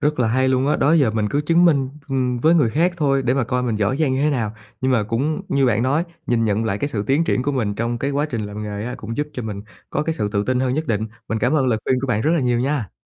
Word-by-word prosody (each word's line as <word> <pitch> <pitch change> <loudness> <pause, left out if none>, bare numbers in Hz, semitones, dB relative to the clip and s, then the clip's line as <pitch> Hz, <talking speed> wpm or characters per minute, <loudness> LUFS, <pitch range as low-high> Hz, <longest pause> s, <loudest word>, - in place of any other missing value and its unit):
Rất 150 -1 0
là 115 - +2
hay 130 +3 +2
luôn 130 +2 +2
á! - - +2
Đó 145 - +3
giờ 140 -9 +4
mình 110 -1 -1
cứ 145 - +1
chứng 165 +3 +3
minh, 140 -6 +3 0.2
ừm, 125 -2 0
với 160 +7 +4
người 140 -9 +3
khác 170 +7 +2
thôi 135 -4 +1
để 125 +1 +1
mà 135 -3 +1
coi 125 +1 -1
mình 115 -3 -1
giỏi 105 +5 0
giang 145 -5 +2
như 135 - 0
thế 150 - +3
nào, 115 -6 -1 0.3
nhưng 130 0 +1
mà 115 -4 +3
cũng 125 +8 -1
như 140 -1 +2
bạn 115 -1 +2
nói, 145 +6 +1 0.2
nhìn 115 -1 +1
nhận 110 +1 0
lại 105 -2 -1
cái 145 - -1
sự 110 -8 -2
tiến 145 +5 +2
triển 125 - 0
của 145 - -1
mình 110 -7 -1
trong 115 +2 -2
cái 140 +3 -1
quá 145 +2 0
trình 115 -3 -2
làm 105 +1 -6
nghề 105 0 -4
á 125 - -4
cũng 115 +1 -6
giúp 150 0 -1
cho 125 - -5
mình 105 -2 -5 0.3
có 150 - 0
cái 160 +1 -1
sự 105 -8 -1
tự 100 0 0
tin 130 0 0
hơn 130 0 0
nhất 155 0 -2
định. 110 -2 0 0.2
Mình 110 - -1
cảm 125 +5 +1
ơn 145 -4 +2
lời 115 -3 +1
khuyên 130 -1 +1
của 135 - -2
bạn 110 -4 0
rất 155 - +1
là 165 - +1
nhiều 125 -2 +1
nha! 130 - -2
130 Hz, 320 wpm, -21 LUFS, 110-145 Hz, 0.3 s, giờ